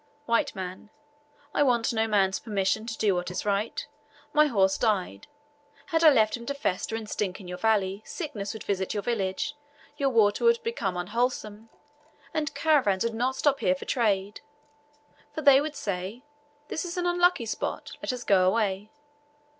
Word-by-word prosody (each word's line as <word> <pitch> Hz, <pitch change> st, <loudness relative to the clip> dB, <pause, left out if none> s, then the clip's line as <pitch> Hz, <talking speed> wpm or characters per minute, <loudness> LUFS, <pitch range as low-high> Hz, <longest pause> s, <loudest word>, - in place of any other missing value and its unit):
W. 230 Hz, -3 st, +3 dB
M. 185 Hz, +2 st, -7 dB, 0.6 s
"I -, -, +1 dB
want 245 Hz, -4 st, +2 dB
no 220 Hz, 0 st, +1 dB
man's 195 Hz, -3 st, +2 dB
permission 215 Hz, +1 st, -1 dB
to 225 Hz, -, -4 dB
do 205 Hz, -3 st, +2 dB
what 175 Hz, 0 st, -2 dB
is 180 Hz, -, -4 dB
right. 205 Hz, +2 st, -1 dB, 0.5 s
My 300 Hz, 0 st, +5 dB
horse 195 Hz, -7 st, +2 dB
died; 190 Hz, -, -1 dB, 0.7 s
had 325 Hz, 0 st, +3 dB
I 320 Hz, -, +10 dB
left 220 Hz, -6 st, +3 dB
him 235 Hz, -1 st, -9 dB
to 280 Hz, -, -2 dB
fester 220 Hz, -4 st, -2 dB
and 225 Hz, -1 st, -5 dB
stink 195 Hz, -2 st, -3 dB
in 190 Hz, -, -11 dB
your 180 Hz, 0 st, -6 dB
valley, 205 Hz, -3 st, +1 dB
sickness 220 Hz, -, -5 dB
would 220 Hz, -, -8 dB
visit 190 Hz, 0 st, -2 dB
your 205 Hz, -, -2 dB
village, 220 Hz, +4 st, -2 dB, 0.4 s
your 275 Hz, -1 st, +2 dB
water 220 Hz, -, +3 dB
would 465 Hz, 0 st, +4 dB
become 205 Hz, -, -2 dB
unwholesome, 220 Hz, +2 st, -2 dB, 0.6 s
and 305 Hz, -2 st, -2 dB
caravans 265 Hz, -, +2 dB
would 230 Hz, 0 st, -1 dB
not 250 Hz, +4 st, 0 dB
stop 280 Hz, 0 st, +2 dB
here 180 Hz, -, +2 dB
for -, -, -9 dB
trade; 205 Hz, -4 st, 0 dB, 0.9 s
for 310 Hz, -, -4 dB
they 275 Hz, -1 st, +7 dB
would 300 Hz, 0 st, -4 dB
say, 200 Hz, +3 st, -4 dB, 0.5 s
'This -, -, -2 dB
is 350 Hz, 0 st, -5 dB
an 355 Hz, -, -1 dB
unlucky 350 Hz, -6 st, +3 dB
spot, 220 Hz, -, -4 dB
let -, -, -1 dB
us 250 Hz, -1 st, -5 dB
go 185 Hz, -2 st, +4 dB
away.' 205 Hz, 0 st, 0 dB
220 Hz, 175 wpm, -27 LUFS, 195-265 Hz, 0.9 s, I